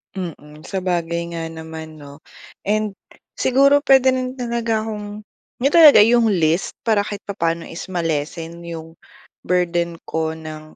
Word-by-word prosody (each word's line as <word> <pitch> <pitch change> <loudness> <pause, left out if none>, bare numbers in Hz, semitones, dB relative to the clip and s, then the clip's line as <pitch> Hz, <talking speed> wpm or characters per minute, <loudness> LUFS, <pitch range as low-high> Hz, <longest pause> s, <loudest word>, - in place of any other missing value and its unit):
Mm, 155 -4 -8
sabagay 170 -3 -2
nga 165 - -3
naman 160 -1 -9
'no. 145 +1 -13 0.4
And 210 0 -1 0.4
siguro 275 +2 +4
puwede 265 -2 +5
rin 255 0 -3
talaga 235 -2 -1
akong 210 -1 -6 0.4
'yun 275 +4 +1
talaga, 315 -7 +9
'yung 230 +1 +5
list 165 -1 0
para 215 -3 +3
kahit 205 -1 -6
papaano 170 -4 -2
is 165 - -7
ma-lessen 165 0 -3
'yung 165 -1 -8 0.5
burden 175 -2 0
ko 160 0 -1
ng 155 -1 -10
175 Hz, 135 wpm, -20 LUFS, 160-220 Hz, 0.5 s, talaga